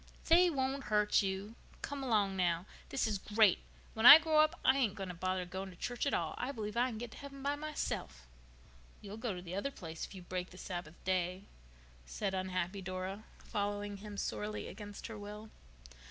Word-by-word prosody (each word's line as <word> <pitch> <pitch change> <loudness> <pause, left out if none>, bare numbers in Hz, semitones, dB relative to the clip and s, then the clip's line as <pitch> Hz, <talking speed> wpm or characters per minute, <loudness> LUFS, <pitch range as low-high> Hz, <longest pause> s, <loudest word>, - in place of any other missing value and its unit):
"They 350 +2 +7
won't 270 -2 -1
hurt 210 0 +3
you. 195 +2 -3 0.3
Come 285 -1 -4
along, 210 -7 +2
now. 175 -1 +1 0.2
This 270 - 0
is 210 -3 -1
great. 210 -1 +4 0.3
When 220 - -3
I 265 +5 +14
grow 320 -1 +2
up 310 +3 +4
I 260 - +6
ain't 245 -8 +1
going 195 -2 -5
to - - -4
bother 185 +1 -1
going 190 +2 -5
to 180 - -12
church 245 +9 -2
at - - 0
all. - - -1
I 260 - -1
believe 215 -4 -5
I 245 +2 +3
can 225 - -6
get 235 0 -6
to - - -11
heaven 275 -1 -9
by 285 +1 +1
myself." 290 - -4 0.8
"You'll 205 +1 -8
go 225 -4 -2
to 180 - -7
the 175 0 -7
other 200 +9 -1
place 165 -11 -8
if - - -7
you 185 - -9
break 180 0 -4
the 180 - -13
Sabbath 175 -4 -6
day," 185 0 0 0.6
said 195 - -2
unhappy 185 0 -2
Dora, 185 +3 -5
following 205 0 -3
him 205 0 -8
sorely 210 +1 -3
against 205 -1 -8
her 220 -2 -6
will. 210 +1 -8
205 Hz, 200 wpm, -34 LUFS, 185-245 Hz, 0.8 s, I